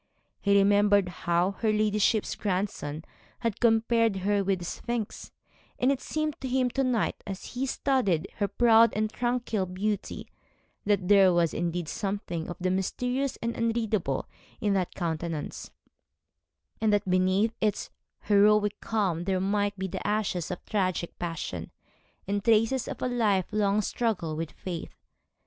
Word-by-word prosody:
He 200 Hz, 0 st, +3 dB
remembered 205 Hz, -1 st, +4 dB
how 175 Hz, +1 st, 0 dB
her 220 Hz, -2 st, +2 dB
ladyship's 210 Hz, 0 st, +2 dB
grandson 180 Hz, -6 st, -3 dB, 0.4 s
had 230 Hz, -4 st, -1 dB
compared 230 Hz, -1 st, +3 dB
her 200 Hz, +1 st, +1 dB
with 195 Hz, 0 st, +1 dB
the 175 Hz, -, -7 dB
Sphinx; 235 Hz, +4 st, -4 dB, 0.5 s
and 255 Hz, +2 st, +3 dB
it 270 Hz, -1 st, -1 dB
seemed 310 Hz, -1 st, -3 dB
to 265 Hz, -, -3 dB
him 255 Hz, -1 st, +1 dB
to 270 Hz, -, 0 dB
night, 250 Hz, -4 st, 0 dB
as 195 Hz, -1 st, -7 dB
he 260 Hz, +2 st, -1 dB
studied 220 Hz, -, +1 dB
her 205 Hz, -, +1 dB
proud 230 Hz, 0 st, +5 dB
and 215 Hz, +1 st, -1 dB
tranquil 240 Hz, -5 st, -1 dB
beauty, 200 Hz, +3 st, -3 dB, 0.6 s
that 200 Hz, -3 st, +1 dB
there 195 Hz, -2 st, +6 dB
was 170 Hz, -2 st, +2 dB
indeed 175 Hz, 0 st, -2 dB
something 195 Hz, -4 st, -3 dB
of 175 Hz, -, -6 dB
the 185 Hz, 0 st, 0 dB
mysterious, 250 Hz, +8 st, -1 dB
the 235 Hz, 0 st, -1 dB
unreadable 225 Hz, -, -1 dB, 0.3 s
in 205 Hz, -2 st, +1 dB
that 185 Hz, -3 st, -1 dB
countenance, 165 Hz, -3 st, -4 dB, 1.1 s
and 220 Hz, -1 st, +3 dB
that 205 Hz, -1 st, +1 dB
beneath 185 Hz, +4 st, +2 dB
its 215 Hz, -1 st, -1 dB, 0.3 s
heroic 210 Hz, 0 st, +3 dB
calm 190 Hz, -6 st, -1 dB
there 190 Hz, -1 st, +1 dB
might 205 Hz, +1 st, 0 dB
be 190 Hz, 0 st, -2 dB
the 185 Hz, +1 st, -5 dB
ashes 205 Hz, -5 st, -1 dB
of 180 Hz, -, -6 dB
tragic 185 Hz, -4 st, -1 dB
passion, 165 Hz, -, -4 dB, 0.6 s
the 200 Hz, +1 st, -1 dB
traces 225 Hz, +3 st, +2 dB
of -, -, -5 dB
a -, -, +1 dB
life 215 Hz, -7 st, +2 dB
long 210 Hz, 0 st, +2 dB
struggle 195 Hz, -9 st, -1 dB
with 160 Hz, 0 st, -3 dB
fate. 175 Hz, -3 st, -6 dB
205 Hz, 150 wpm, -28 LUFS, 185-225 Hz, 1.1 s, there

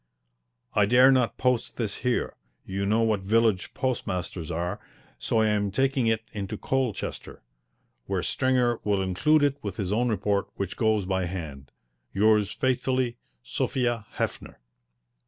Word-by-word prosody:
I 105 Hz, -1 st, +3 dB
dare 125 Hz, +4 st, +7 dB
not 130 Hz, -3 st, +2 dB
post 125 Hz, -2 st, 0 dB
this 110 Hz, -4 st, -2 dB
here 125 Hz, -2 st, -1 dB, 0.3 s
you 100 Hz, +1 st, -2 dB
know 110 Hz, +3 st, +3 dB
what 110 Hz, -2 st, +2 dB
village 110 Hz, 0 st, +1 dB
postmasters 90 Hz, -, -3 dB
are, 85 Hz, +4 st, -3 dB, 0.4 s
so 65 Hz, -, +1 dB
I 110 Hz, -, +3 dB
am 105 Hz, -1 st, +1 dB
taking 130 Hz, +3 st, +1 dB
it 110 Hz, 0 st, +1 dB
into 105 Hz, +1 st, -4 dB
Colchester, 130 Hz, -5 st, -3 dB, 0.6 s
where -, -, -1 dB
Stringer 125 Hz, -3 st, +1 dB
will 100 Hz, -2 st, +1 dB
include 145 Hz, +12 st, +3 dB
it 140 Hz, -1 st, +2 dB
with 100 Hz, -3 st, -5 dB
his 100 Hz, -1 st, -2 dB
own 120 Hz, +3 st, +1 dB
report 105 Hz, -2 st, 0 dB
which 100 Hz, -2 st, -4 dB
goes 110 Hz, -3 st, +1 dB
by 95 Hz, -1 st, 0 dB
hand. 75 Hz, -7 st, -6 dB, 0.5 s
Yours 105 Hz, 0 st, +3 dB
faithfully, 130 Hz, -1 st, 0 dB, 0.3 s
SOPHIA 120 Hz, -, -1 dB
HEFFNER. -, -, -4 dB
110 Hz, 140 wpm, -26 LUFS, 95-125 Hz, 0.6 s, dare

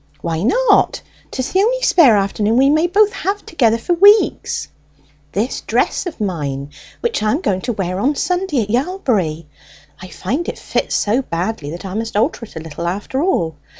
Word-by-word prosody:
"Why 165 Hz, -1 st, -2 dB
not? -, -, +2 dB, 0.3 s
'Tis 260 Hz, -1 st, -4 dB
the 375 Hz, -, +2 dB
only -, -, +1 dB
spare 270 Hz, -, +5 dB
afternoon 205 Hz, +3 st, 0 dB
we 270 Hz, +2 st, +5 dB
may 315 Hz, +3 st, +3 dB
both 415 Hz, +3 st, +3 dB
have 400 Hz, +2 st, -3 dB
together 230 Hz, -8 st, +2 dB
for 290 Hz, +9 st, -1 dB
weeks." 405 Hz, +5 st, +4 dB, 0.7 s
"This 220 Hz, +6 st, -2 dB
dress -, -, 0 dB
of 325 Hz, -, -7 dB
mine, 145 Hz, -8 st, -3 dB, 0.3 s
that 470 Hz, -, 0 dB
I 215 Hz, -, +1 dB
am 295 Hz, -, 0 dB
going 190 Hz, -, 0 dB
to 240 Hz, -, -2 dB
wear 185 Hz, -2 st, -3 dB
on 280 Hz, +8 st, +1 dB
Sunday 355 Hz, -7 st, 0 dB
at 205 Hz, -, -6 dB
Yalbury; 235 Hz, -, -1 dB, 0.6 s
I 185 Hz, -, -8 dB
find 265 Hz, -, -3 dB
it -, -, -6 dB
fits -, -, -2 dB
so 220 Hz, +6 st, +1 dB
badly 175 Hz, -, -3 dB
that 170 Hz, +5 st, -7 dB
I 185 Hz, -, -5 dB
must 220 Hz, 0 st, -3 dB
alter 230 Hz, +2 st, 0 dB
it -, -, -18 dB
a -, -, -4 dB
little, 160 Hz, +1 st, -6 dB
after 205 Hz, +9 st, -2 dB
all. 170 Hz, -, 0 dB
225 Hz, 185 wpm, -18 LUFS, -, 0.7 s, spare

